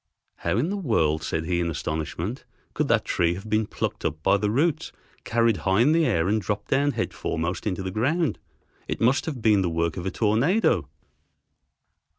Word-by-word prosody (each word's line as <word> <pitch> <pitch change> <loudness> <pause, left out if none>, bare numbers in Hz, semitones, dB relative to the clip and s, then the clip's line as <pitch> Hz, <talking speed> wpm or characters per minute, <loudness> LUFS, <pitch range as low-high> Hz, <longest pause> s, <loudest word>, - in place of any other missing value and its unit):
"How 85 +4 -1
in 155 +10 0
the 205 - -2
world," 80 - +1
said 80 +3 -2
he 85 +1 0
in 85 -1 0
astonishment, 80 - -4 0.3
"could - - 0
that - - +2
tree 85 0 +1
have 95 +4 -9
been 110 0 +1
plucked - - -4
up 80 +1 -3
by 100 - +4
the 105 +1 0
roots, 145 +8 0 0.3
carried 115 -2 +2
high 95 +6 +2
in 140 +5 +4
the 165 0 +3
air, 80 +1 +1
and 110 +2 +1
dropped 100 +2 -3
down 145 +1 +2
head - - -2
foremost 85 +4 -3
into 95 -1 -2
the 95 - -3
ground. 145 - 0 0.5
It - - -3
must 125 +7 +2
have 135 -8 -4
been 105 -3 +4
the 90 - 0
work 85 +1 -1
of 90 +1 -4
a - - +1
tornado." 120 - +2
105 Hz, 195 wpm, -25 LUFS, 85-125 Hz, 0.5 s, by